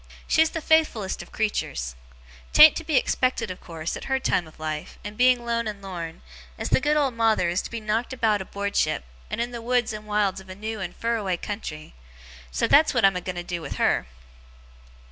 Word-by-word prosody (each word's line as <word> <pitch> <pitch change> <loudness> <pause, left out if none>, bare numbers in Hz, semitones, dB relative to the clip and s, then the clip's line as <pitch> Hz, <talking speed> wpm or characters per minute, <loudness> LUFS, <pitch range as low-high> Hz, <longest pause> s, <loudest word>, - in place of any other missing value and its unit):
She's 320 0 +4
the 325 - -4
faithfullest 305 -12 +2
of - - -13
creeturs. 60 - -2 0.6
'Tan't 310 - +9
to 330 - -4
be 315 -2 -1
expected, 255 -4 +1
of 185 - -9
course, 165 -1 -5
at - - -7
her 265 0 0
time 180 -9 0
of 155 - -17
life, 155 -1 -5
and 205 +1 -7
being 250 0 +4
lone 235 -1 0
and 210 -1 -5
lorn, 175 - -7 0.3
as - - -3
the - - +3
good 300 +2 +2
old 280 -4 +2
Mawther 225 -6 +2
is 180 - 0
to - - -7
be 230 - -4
knocked 220 +3 -1
about 220 -5 +1
aboardship, 200 - -1 0.3
and - - -3
in 240 +1 -1
the 235 -1 -6
woods 245 -1 +1
and 215 0 -8
wilds 205 -2 +1
of 190 - -17
a 185 - -7
new 215 +2 -5
and 190 - -5
fur 230 0 0
away 190 -5 -1
country. 165 -7 -6 0.6
So - - 0
that's 300 -1 +5
what 235 - +4
I'm 195 -1 +4
a 180 - -2
going 185 0 -5
to 175 - -4
do 175 -1 -4
with 145 - -6
her. - - +1
210 Hz, 220 wpm, -25 LUFS, 180-240 Hz, 0.6 s, Tan't